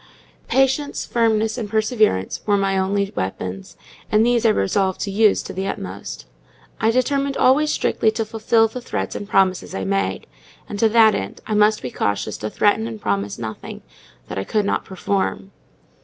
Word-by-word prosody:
Patience, 270 Hz, +2 st, +1 dB
Firmness, 225 Hz, -1 st, +1 dB
and 215 Hz, -3 st, -4 dB
Perseverance 215 Hz, -, +1 dB
were 205 Hz, -1 st, +3 dB
my 195 Hz, -1 st, +1 dB
only 200 Hz, +1 st, 0 dB
weapons; 95 Hz, 0 st, -5 dB, 0.3 s
and 215 Hz, +1 st, +4 dB
these 240 Hz, -1 st, +3 dB
I -, -, +5 dB
resolved 190 Hz, -, +1 dB
to 200 Hz, -, -2 dB
use 210 Hz, +1 st, +3 dB
to -, -, -7 dB
the 190 Hz, +1 st, -3 dB
utmost. -, -, -6 dB, 0.5 s
I 220 Hz, -, +2 dB
determined 275 Hz, +3 st, 0 dB
always 295 Hz, +4 st, +4 dB
strictly 220 Hz, -, +1 dB
to 225 Hz, 0 st, -2 dB
fulfil 225 Hz, +1 st, +2 dB
the 250 Hz, +3 st, -7 dB
threats -, -, -3 dB
and 205 Hz, -, -6 dB
promises 190 Hz, -1 st, +1 dB
I 95 Hz, -, -3 dB
made; 95 Hz, 0 st, -1 dB, 0.4 s
and, 205 Hz, -, -6 dB
to 225 Hz, -, +4 dB
that 220 Hz, -1 st, +6 dB
end, 95 Hz, -, -4 dB
I 215 Hz, -, -3 dB
must 210 Hz, +1 st, +3 dB
be 125 Hz, -, -4 dB
cautious 100 Hz, +1 st, -2 dB
to 110 Hz, -, -3 dB
threaten 160 Hz, -, +2 dB
and 115 Hz, -2 st, -7 dB
promise 100 Hz, 0 st, -2 dB
nothing 110 Hz, -2 st, -7 dB, 0.4 s
that -, -, -4 dB
I -, -, -2 dB
could 210 Hz, -, 0 dB
not -, -, -1 dB
perform. 195 Hz, +1 st, -2 dB
205 Hz, 175 wpm, -21 LUFS, -, 0.5 s, that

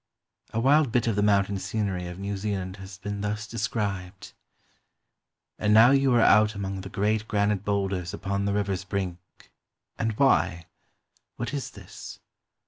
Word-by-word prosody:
A 115 Hz, -, -1 dB
wild 140 Hz, +2 st, +4 dB
bit 120 Hz, 0 st, +2 dB
of 115 Hz, -3 st, +1 dB
the 105 Hz, -, +1 dB
mountain 100 Hz, -1 st, +2 dB
scenery 95 Hz, -2 st, -2 dB
of 90 Hz, 0 st, -7 dB
New 100 Hz, +1 st, -3 dB
Zealand 95 Hz, -2 st, -3 dB
has 95 Hz, 0 st, -10 dB
been 100 Hz, +2 st, -5 dB
thus 105 Hz, +1 st, -2 dB
described: 100 Hz, -4 st, -4 dB, 0.6 s
— -, -, -55 dB
"And 105 Hz, 0 st, +3 dB
now 115 Hz, +4 st, +8 dB
you 135 Hz, -1 st, +4 dB
are 120 Hz, -, +5 dB
out 105 Hz, 0 st, +5 dB
among 95 Hz, -1 st, -4 dB
the 95 Hz, -, -8 dB
great 105 Hz, +3 st, 0 dB
granite 100 Hz, -2 st, +1 dB
boulders 95 Hz, -4 st, -1 dB
upon 100 Hz, 0 st, -2 dB
the 100 Hz, -, 0 dB
river's 100 Hz, -2 st, -1 dB
brink, 95 Hz, -3 st, -3 dB, 0.5 s
— -, -, -46 dB
and 115 Hz, -1 st, 0 dB
why! 90 Hz, -, +2 dB, 0.7 s
what 120 Hz, -, -4 dB
is 140 Hz, -3 st, -3 dB
this? -, -, -11 dB
100 Hz, 165 wpm, -26 LUFS, 95-110 Hz, 0.7 s, now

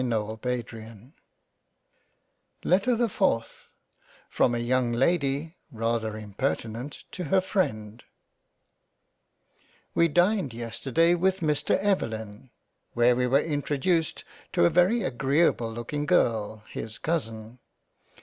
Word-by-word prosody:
£««£«^«:£««£ 115 Hz, 0 st, -4 dB, 1.5 s
LETTER 200 Hz, +7 st, +3 dB
the 235 Hz, +1 st, +1 dB
FOURTH 180 Hz, -, -1 dB, 0.6 s
From 120 Hz, -, +2 dB
a -, -, 0 dB
YOUNG 120 Hz, 0 st, +1 dB
LADY 145 Hz, +4 st, 0 dB
rather 115 Hz, -2 st, -2 dB
impertinent 115 Hz, +4 st, -4 dB
to 180 Hz, -, -5 dB
her 190 Hz, +6 st, +3 dB
freind 115 Hz, -, -2 dB, 1.9 s
WE 170 Hz, -, +4 dB
dined 175 Hz, -, +2 dB
yesterday 130 Hz, +8 st, +1 dB
with 190 Hz, +2 st, +1 dB
Mr 150 Hz, -3 st, +1 dB
Evelyn 110 Hz, -, -2 dB, 0.4 s
where 120 Hz, +1 st, +4 dB
we 125 Hz, 0 st, +1 dB
were 135 Hz, +3 st, +4 dB
introduced 155 Hz, +2 st, -1 dB, 0.3 s
to 85 Hz, -, +3 dB
a -, -, +4 dB
very 190 Hz, +7 st, +3 dB
agreable 135 Hz, -2 st, +1 dB
looking 130 Hz, +6 st, -4 dB
Girl 110 Hz, -, +1 dB
his 110 Hz, 0 st, -6 dB
Cousin. 115 Hz, -7 st, -3 dB
130 Hz, 100 wpm, -27 LUFS, 115-170 Hz, 1.9 s, WE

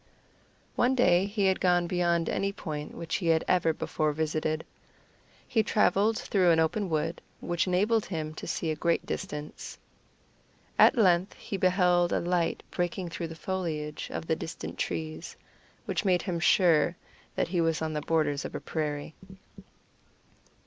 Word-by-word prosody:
One 250 Hz, +2 st, +2 dB
day 185 Hz, -6 st, +4 dB
he 200 Hz, -1 st, 0 dB
had 190 Hz, -1 st, +2 dB
gone 175 Hz, -1 st, +3 dB
beyond 170 Hz, -2 st, +1 dB
any 200 Hz, 0 st, 0 dB
point 150 Hz, -6 st, -6 dB
which 165 Hz, -1 st, -3 dB
he 180 Hz, -, -3 dB
had 160 Hz, -1 st, +3 dB
ever 175 Hz, -3 st, +3 dB
before 155 Hz, -1 st, -1 dB
visited. 155 Hz, 0 st, -1 dB, 0.8 s
He 225 Hz, -, +2 dB
traveled 210 Hz, +1 st, +2 dB
through 195 Hz, -7 st, +2 dB
an 165 Hz, -1 st, +4 dB
open 175 Hz, +5 st, 0 dB
wood, 160 Hz, +1 st, -1 dB, 0.2 s
which 175 Hz, +1 st, -1 dB
enabled 205 Hz, +5 st, +2 dB
him 155 Hz, -4 st, -4 dB
to -, -, -8 dB
see 160 Hz, -, -1 dB
a -, -, -2 dB
great 170 Hz, +2 st, 0 dB
distance. 150 Hz, 0 st, -6 dB, 1.0 s
At -, -, +7 dB
length 185 Hz, -3 st, +3 dB
he -, -, -6 dB
beheld 180 Hz, -2 st, +3 dB
a -, -, +2 dB
light 175 Hz, -1 st, 0 dB
breaking 175 Hz, 0 st, -2 dB
through 170 Hz, 0 st, -4 dB
the 165 Hz, -, -9 dB
foliage 160 Hz, -4 st, -4 dB
of -, -, -4 dB
the 160 Hz, -, +1 dB
distant 160 Hz, -, -7 dB
trees, 160 Hz, +1 st, -4 dB, 0.5 s
which -, -, -1 dB
made 185 Hz, -3 st, +2 dB
him 175 Hz, -4 st, -2 dB
sure 170 Hz, -1 st, +4 dB, 0.4 s
that -, -, 0 dB
he 175 Hz, -1 st, +1 dB
was 165 Hz, -1 st, +1 dB
on 160 Hz, -1 st, -2 dB
the 150 Hz, -, -2 dB
borders 150 Hz, -3 st, 0 dB
of -, -, -6 dB
a -, -, -2 dB
prairie. 150 Hz, -1 st, -3 dB
170 Hz, 160 wpm, -28 LUFS, 160-185 Hz, 1.0 s, At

